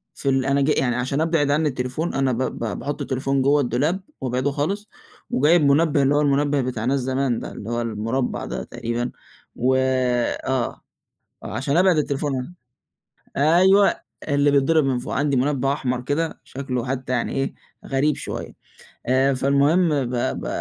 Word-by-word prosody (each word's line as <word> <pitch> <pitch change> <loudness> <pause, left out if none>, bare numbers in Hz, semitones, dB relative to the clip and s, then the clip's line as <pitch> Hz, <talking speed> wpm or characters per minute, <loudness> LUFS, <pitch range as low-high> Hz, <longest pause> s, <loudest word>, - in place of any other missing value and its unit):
في 140 - -2
ال 135 -1 +1
أنا 140 +1 +2
ج 140 - +2
يعني 125 -5 +1
عشان 130 +4 -1
أبعِد 160 -3 +1
عنّي 150 +1 +2
التليفون، 130 +6 -3
أنا 135 -1 +1
ب 115 - -2
ب 110 -7 -3
باحُط 145 0 -4
التليفون 135 +1 -1
جوّه 145 +2 +3
الدولاب 145 - 0 0.2
وأبعده 130 +2 -1
خالص 195 +9 -2 0.4
وجايب 155 +5 +4
مُنبّه 145 0 +3
اللي 140 +2 +3
هو 150 - +3
المُنبّه 145 0 +2
بتاع 120 -3 -3
ناس 135 +2 +1
زمان 130 -1 0
ده، - - -7
اللي 105 - -8
هو 120 0 -1
المُربّع 115 +3 -2
ده - - -4
تقريبًا. 120 +1 -4 0.4
و 130 +2 +2
آه، 130 -1 0 0.6
آه، - - -6
عشان 140 +7 0
أبعِد 180 -3 +4
التليفون 140 +1 -2 0.8
أيوه، 185 +7 +5 0.3
اللي 145 0 +3
بيِتضرب 145 +2 +3
من 130 -2 +1
فوق. 125 - -5
عندي 140 -1 +1
مُنبّه 135 +1 +1
أحمر 125 -3 -2
كده، 150 +6 -2
شكله 130 -2 -4
حتّى 130 0 -3
يعني 120 - -1
إيه، 135 0 -1 0.3
غريب 140 +2 +1
شوية. - - -6 0.5
آآ 135 +2 +3
فالمهم 140 +6 +3 0.2
ب 125 +1 -3
ب 120 - -2
135 Hz, 165 wpm, -22 LUFS, 125-145 Hz, 0.8 s, أيوه